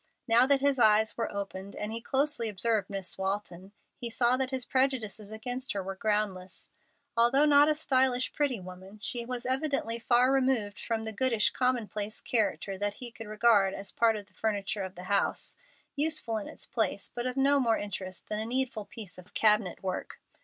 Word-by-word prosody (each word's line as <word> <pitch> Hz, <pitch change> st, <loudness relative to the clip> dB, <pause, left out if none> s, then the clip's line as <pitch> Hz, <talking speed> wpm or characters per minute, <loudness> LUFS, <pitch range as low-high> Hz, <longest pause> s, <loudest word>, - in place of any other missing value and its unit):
Now 235 Hz, +2 st, +6 dB
that 280 Hz, -1 st, +3 dB
his 280 Hz, -2 st, +2 dB
eyes 220 Hz, -1 st, +5 dB
were 230 Hz, -, -2 dB
opened, 200 Hz, -1 st, -6 dB
and 210 Hz, +1 st, -3 dB
he 230 Hz, +1 st, -4 dB
closely 270 Hz, -2 st, +1 dB
observed 210 Hz, 0 st, 0 dB
Miss 195 Hz, -2 st, -3 dB
Walton, 190 Hz, -1 st, -3 dB, 0.2 s
he 240 Hz, -, -5 dB
saw 240 Hz, +2 st, +3 dB
that 260 Hz, 0 st, -1 dB
his 260 Hz, -2 st, -3 dB
prejudices 235 Hz, -6 st, -1 dB
against 245 Hz, +4 st, -3 dB
her 200 Hz, -2 st, -3 dB
were 195 Hz, +1 st, -4 dB
groundless. 195 Hz, -3 st, -2 dB, 0.4 s
Although 240 Hz, +5 st, +4 dB
not 290 Hz, 0 st, +6 dB
a 305 Hz, -, +2 dB
stylish, 260 Hz, -4 st, +1 dB
pretty 280 Hz, -6 st, 0 dB
woman, 185 Hz, +2 st, -11 dB
she 235 Hz, +2 st, -2 dB
was 250 Hz, -1 st, -4 dB
evidently 260 Hz, -3 st, 0 dB
far 245 Hz, +2 st, +3 dB
removed 255 Hz, -6 st, +1 dB
from 225 Hz, -1 st, -2 dB
the 220 Hz, -, -3 dB
goodish, 230 Hz, -2 st, +2 dB
commonplace 220 Hz, -4 st, -1 dB
character 205 Hz, -4 st, -1 dB
that 205 Hz, 0 st, -1 dB
he 240 Hz, +1 st, -5 dB
could 225 Hz, -1 st, -10 dB
regard 210 Hz, -3 st, +3 dB
as 200 Hz, -, -4 dB
part 230 Hz, -1 st, +3 dB
of 205 Hz, -1 st, -6 dB
the -, -, -30 dB
furniture 205 Hz, -1 st, -2 dB
of 190 Hz, -1 st, -6 dB
the 180 Hz, -, -9 dB
house, 200 Hz, +2 st, 0 dB, 0.4 s
useful 295 Hz, -6 st, +1 dB
in 210 Hz, -, -5 dB
its -, -, -8 dB
place, 210 Hz, -4 st, -1 dB
but 240 Hz, +1 st, -3 dB
of 250 Hz, +1 st, -4 dB
no 280 Hz, +1 st, +4 dB
more 230 Hz, -4 st, +2 dB
interest 185 Hz, -2 st, -6 dB
than 210 Hz, -, -2 dB
a 220 Hz, -, -2 dB
needful 245 Hz, -3 st, -1 dB
piece 200 Hz, -6 st, -7 dB
of 180 Hz, -, -16 dB
cabinet 210 Hz, -5 st, +2 dB
work. 185 Hz, -1 st, -4 dB
225 Hz, 190 wpm, -29 LUFS, 200-255 Hz, 0.4 s, Now